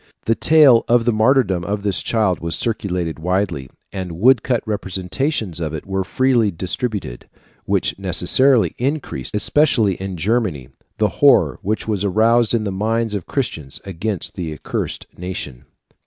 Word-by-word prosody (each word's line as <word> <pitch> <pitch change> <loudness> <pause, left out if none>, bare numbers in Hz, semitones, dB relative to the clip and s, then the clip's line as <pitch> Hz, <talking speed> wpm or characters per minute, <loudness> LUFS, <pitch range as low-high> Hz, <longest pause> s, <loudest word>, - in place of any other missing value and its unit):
The 115 - +3
tale 145 -3 +5
of 120 -1 +3
the 120 - +2
martyrdom 110 -5 +2
of 100 +3 -3
this 100 -3 0
child 105 -6 0
was 85 0 -3
circulated 90 -8 -3
widely, 90 -6 -1 0.2
and 95 -3 -5
woodcut 125 +1 +3
representations 95 - -2
of 80 -2 -3
it 75 - -7
were 95 0 -2
freely 120 +2 +2
distributed, 95 - -4 0.4
which - - 0
necessarily 130 -3 +3
increased, 130 - -3
especially 115 -3 +2
in 95 0 -6
Germany, 90 - -1 0.3
the - - +2
horror - - +5
which 110 +3 -2
was 105 -3 -1
aroused 115 +4 +3
in 110 - 0
the 100 - -2
minds 110 +3 -1
of 100 -5 -4
Christians 80 - -4
against 95 +1 -4
the 85 -4 -5
accursed - - -4
nation 90 - -6
(Fig. - - -42
105 Hz, 150 wpm, -19 LUFS, 90-115 Hz, 0.4 s, tale